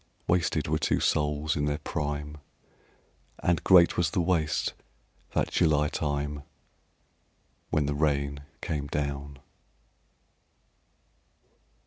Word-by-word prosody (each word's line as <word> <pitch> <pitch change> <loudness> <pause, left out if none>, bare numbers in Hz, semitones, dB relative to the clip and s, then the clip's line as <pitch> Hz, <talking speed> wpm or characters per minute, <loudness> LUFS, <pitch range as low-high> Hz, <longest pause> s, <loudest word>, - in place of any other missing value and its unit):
Wasted 85 -1 +1
were - - +1
two - - +1
souls 75 +1 +1
in 75 -2 0
their 75 0 0
prime, 75 -1 -4 1.0
And 85 -2 0
great 90 -3 +6
was 85 -3 +2
the 95 - -1
waste, 85 -3 +1 0.6
that - - +1
July 75 -1 +3
time 75 -1 -2 1.3
When 75 - +1
the 75 - -1
rain 70 -1 0 0.2
came 70 -2 -3
down. 70 -1 -3
75 Hz, 100 wpm, -28 LUFS, 70-80 Hz, 1.3 s, great